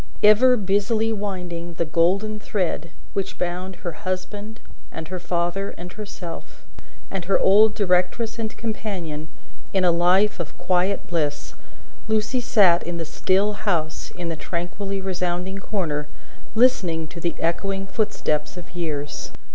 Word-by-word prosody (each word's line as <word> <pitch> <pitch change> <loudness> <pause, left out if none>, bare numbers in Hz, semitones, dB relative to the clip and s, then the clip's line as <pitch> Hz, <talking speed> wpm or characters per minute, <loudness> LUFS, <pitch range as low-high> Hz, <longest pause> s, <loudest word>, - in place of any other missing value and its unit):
Ever 240 +5 +7
busily 215 +3 +2
winding 180 -5 -4
the 170 - 0
golden 190 +7 +2
thread 180 -6 -1 0.2
which 195 - -2
bound 180 +1 -2
her 175 - -4
husband, 205 +6 -4 0.3
and 160 - -6
her 185 0 -3
father, 175 +3 -1
and 175 +1 -8
herself, 200 -5 -8 0.5
and 190 -3 -3
her 195 - +4
old 210 +3 +6
directress 205 +4 +1
and 220 -1 -3
companion, 185 -9 -4 0.5
in 190 -1 +3
a 175 - +6
life 180 +4 +4
of 170 - -5
quiet 185 +2 +1
bliss, 150 -4 -2 0.5
Lucie 220 +3 +1
sat 190 -7 +5
in 175 0 -4
the 165 - -2
still 195 +6 +2
house 170 -7 -1
in 175 -1 -3
the 165 - -2
tranquilly 190 +5 -3
resounding 185 0 -2
corner, 160 -8 -2 0.5
listening 180 -10 +3
to 175 - -8
the 170 - 0
echoing 195 +4 -1
footsteps 190 -7 -1
of 180 0 -10
years. 150 -4 -3
185 Hz, 140 wpm, -24 LUFS, 170-205 Hz, 0.5 s, Ever